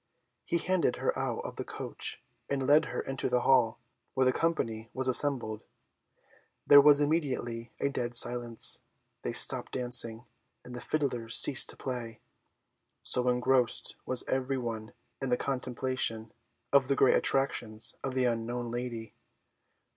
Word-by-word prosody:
He 170 - 0
handed 180 -5 0
her - - -2
out - - -3
of - - -8
the - - -4
coach - - -6 0.3
and 135 -1 -2
led 150 +3 +4
her - - -4
into 135 -1 -4
the 125 - +1
hall, 125 -4 +2 0.4
where 130 -1 +2
the 130 - +4
company 115 -9 -2
was 130 0 -1
assembled. 125 -5 +3 1.0
There 145 - +8
was 145 0 +6
immediately 130 -7 -2
a - - 0
dead 120 -3 -4
silence; 120 -1 +1 0.4
they - - -3
stopped - - +3
dancing, 120 -2 +2 0.4
and 125 - -10
the 120 - -6
fiddlers 120 -5 -2
ceased 135 - +5
to - - -8
play, 120 -4 -6 0.8
so 125 0 +1
engrossed 125 0 0
was 130 - +2
every 130 +1 -1
one 115 -3 -6 0.3
in 135 - -2
the 125 - +2
contemplation 125 -4 -3 0.4
of 140 -2 +4
the 140 - +1
great 135 - +4
attractions 120 -5 0
of 135 -1 -4
the 130 -1 +1
unknown 120 0 -3
lady. 120 -3 -6
125 Hz, 145 wpm, -29 LUFS, 115-135 Hz, 1.0 s, There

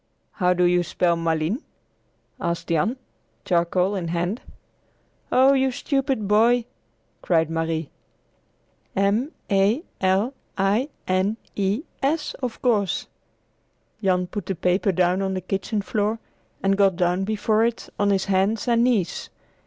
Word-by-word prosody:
"How 180 -2 +1
do 180 - +2
you 175 0 +4
spell 175 0 +1
Malines?" 165 - -1 0.8
asked 170 0 -3
Jan, 195 - +1 0.5
charcoal 180 +2 +1
in 180 -3 -3
hand. 175 +6 -2 0.9
"Oh, 265 +2 +6
you 265 -1 +3
stupid 265 -4 -1
boy!" 230 +3 +4 0.6
cried 165 -2 +1
Marie. 165 -1 -2 1.0
"M 205 +9 +1 0.2
a 200 - +3 0.2
l 195 +7 +2 0.2
i 205 +8 +1 0.2
n 185 +4 +1 0.2
e 200 +7 0 0.2
s, 300 +3 0
of 245 -3 -3
course!" 210 -6 +1 1.0
Jan 180 -1 +2
put 200 +3 -6
the 195 - -1
paper 180 +4 +1
down 180 +1 +2
on 190 -1 -1
the - - -1
kitchen 195 +3 -2
floor 210 +2 0 0.5
and 195 0 +3
got 195 -2 +4
down 180 +1 +1
before 215 +1 +1
it 235 0 -1
on 205 0 +3
his 195 -1 +2
hands 195 +4 +1
and 235 -1 +3
knees. 215 -9 0
195 Hz, 135 wpm, -24 LUFS, 180-225 Hz, 1.0 s, Oh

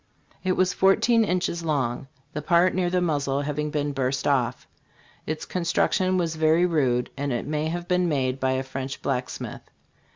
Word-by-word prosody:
It 185 -1 +2
was 185 0 +2
fourteen 225 +4 +4
inches 180 -3 -1
long, 135 -4 -1 0.3
the 150 - -3
part 170 +4 +3
near 180 -1 +1
the 180 0 +1
muzzle 145 -4 0
having 150 +1 -2
been 145 -1 -1
burst 135 -1 -1
off. 135 -4 0 0.6
Its 155 0 -3
construc 170 -2 0
tion 185 0 +1
was 165 -3 -1
very 160 +2 +4
rude, 130 -8 +1
and 140 0 -2
it 120 - -2
may 150 +1 -1
have 175 +2 -4
been 180 -1 +2
made 135 -3 0
by 130 0 +1
a 130 0 -1
French 135 0 -6
blacksmith. 130 -2 -3
150 Hz, 175 wpm, -25 LUFS, 135-175 Hz, 0.6 s, fourteen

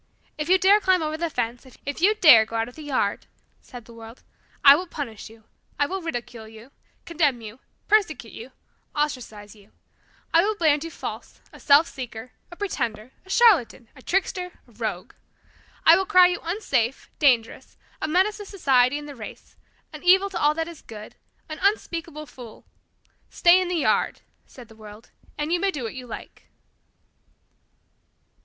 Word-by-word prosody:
If 300 +2 -5
you 375 - +6
dare 390 +3 +5
climb 375 -4 +2
over 310 0 -3
the 335 +1 -3
fence 240 -3 -3 0.2
if 285 +3 -5
you 415 +4 +4
dare 295 - +7
go 225 +1 -9
out 225 0 -1
of 245 - -12
the 315 - -11
yard," 290 -3 -2 0.3
said 245 -3 -12
the 235 - -15
world, 230 +1 -13 0.4
"I 280 0 +10
will 360 +4 -4
punish 240 -11 -7
you 225 0 -18 0.3
I 290 - +2
will 380 +5 -4
ridicule 240 -7 -6
you, 225 +4 -15 0.3
condemn 300 -7 0
you, 225 +2 -11 0.3
persecute 350 - +1
you, 235 +4 -10 0.4
ostracize 235 -8 -4
you. 205 -1 -21 0.6
I 330 - +6
will 425 +4 0
brand 310 -5 +2
you 330 - -6
false, - - -8
a - - -13
self 290 +3 +5
seeker, 250 -2 -8 0.2
a 345 - -11
pretender, 245 - -4 0.2
a - - -17
charlatan, 370 - +3
a 260 - -15
trickster, 360 +2 -2
a - - -21
rogue. 215 -5 -5 0.7
I - - +8
will 385 - -1
cry 365 -3 +6
you 355 - -3
unsafe, 275 - -2
dangerous, 245 -6 +1 0.2
a - - -1
menace 375 +6 +1
to 415 - -9
society 270 -8 +2
and 295 0 -8
the 290 - -8
race, 220 -4 -11 0.4
an 305 - -9
evil 380 +2 +4
to 350 - -4
all 295 +1 +2
that 325 0 -2
is 340 -2 -11
good, 215 -1 -11 0.3
an 310 - -8
unspeakable 335 -6 -2
fool. 245 -6 -13 0.6
Stay 355 +1 +4
in 365 - -2
the 360 - -2
yard," 325 - 0 0.3
said 250 -3 -14
the 220 - -17
world, 215 0 -14 0.3
"and 300 +3 -2
you 350 - +1
may 395 - +1
do 295 -9 -5
what 225 - -5
you 255 -1 -9
like." 230 - -11
290 Hz, 180 wpm, -24 LUFS, 235-355 Hz, 0.7 s, I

